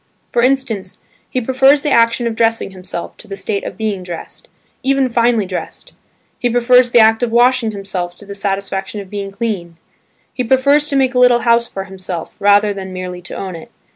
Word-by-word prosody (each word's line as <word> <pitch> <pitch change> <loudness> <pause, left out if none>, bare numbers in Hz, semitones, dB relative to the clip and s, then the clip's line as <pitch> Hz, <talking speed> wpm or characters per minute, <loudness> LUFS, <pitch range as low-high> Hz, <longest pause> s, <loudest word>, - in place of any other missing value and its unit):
For 240 - +2
instance, 235 -7 0 0.3
he 255 - -1
prefers 265 +4 +3
the 295 - 0
action 230 0 +3
of 230 -1 -2
dressing 225 -3 +1
himself 185 -2 -7
to - - -12
the 195 - -6
state 200 -1 -2
of - - -7
being 215 -3 -2
dressed, 175 -2 -8 0.3
even 270 -1 +1
finely 235 -2 +2
dressed. 185 -1 -7 0.5
He 245 - 0
prefers 245 +1 +4
the 240 - +3
act 225 +1 +5
of 240 -2 0
washing 240 0 +3
himself 190 -4 -5
to 205 - -12
the 200 - -8
satisfaction 195 0 -3
of 195 -2 -10
being 200 -1 -4
clean: 195 -5 -4 0.6
he 250 - -2
prefers 280 +4 +3
to 285 - 0
make 265 -1 +2
a 250 - +1
little 245 -1 +5
house 235 +1 +3
for 195 - -6
himself, 185 -3 -7
rather 205 +1 +4
than 190 -1 -7
merely 180 -1 -6
to 175 - -8
own 185 -2 -5
it. 165 - -11
220 Hz, 200 wpm, -17 LUFS, 195-245 Hz, 0.6 s, act